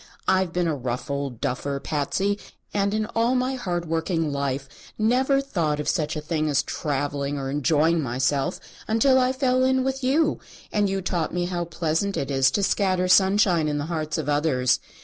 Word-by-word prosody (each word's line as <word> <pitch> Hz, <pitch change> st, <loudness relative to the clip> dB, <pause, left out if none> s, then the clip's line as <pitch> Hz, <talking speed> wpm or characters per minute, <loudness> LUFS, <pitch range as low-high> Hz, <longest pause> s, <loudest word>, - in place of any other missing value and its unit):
I've 190 Hz, -2 st, +2 dB
been 175 Hz, 0 st, 0 dB
a 160 Hz, -, +1 dB
rough 125 Hz, 0 st, -4 dB
old 140 Hz, -4 st, -3 dB
duffer, 140 Hz, +2 st, -2 dB
Patsy, 190 Hz, +9 st, -1 dB, 0.3 s
and 200 Hz, 0 st, +1 dB
in 215 Hz, +1 st, 0 dB
all 230 Hz, +3 st, +2 dB
my 255 Hz, +1 st, 0 dB
hard 180 Hz, -9 st, -3 dB
working 165 Hz, -1 st, -1 dB
life 140 Hz, -1 st, -2 dB, 0.3 s
never 255 Hz, +5 st, +2 dB
thought 165 Hz, -, -1 dB
of 150 Hz, -, -3 dB
such 155 Hz, -4 st, 0 dB
a 155 Hz, -, -3 dB
thing 155 Hz, 0 st, -1 dB
as 140 Hz, -1 st, +2 dB
travelling 145 Hz, -1 st, -2 dB
or 135 Hz, -1 st, -3 dB
enjoying 155 Hz, +3 st, +2 dB
myself 135 Hz, +5 st, 0 dB, 0.3 s
until 260 Hz, +4 st, +4 dB
I 255 Hz, 0 st, +3 dB
fell 255 Hz, -1 st, +1 dB
in 260 Hz, 0 st, +2 dB
with 265 Hz, 0 st, -2 dB
you, 295 Hz, +5 st, +2 dB, 0.3 s
and 205 Hz, -1 st, +1 dB
you 195 Hz, -1 st, -2 dB
taught 175 Hz, -2 st, -1 dB
me 175 Hz, 0 st, 0 dB
how 175 Hz, -1 st, -2 dB
pleasant 170 Hz, +4 st, -1 dB
it 140 Hz, 0 st, -2 dB
is 135 Hz, -1 st, +4 dB
to 200 Hz, +10 st, -1 dB
scatter 185 Hz, -2 st, +1 dB
sunshine 190 Hz, -3 st, +4 dB
in 150 Hz, -1 st, -1 dB
the 145 Hz, -, -2 dB
hearts 155 Hz, 0 st, -2 dB
of 155 Hz, -3 st, -3 dB
others. 145 Hz, -4 st, +2 dB
165 Hz, 190 wpm, -24 LUFS, 145-205 Hz, 0.3 s, until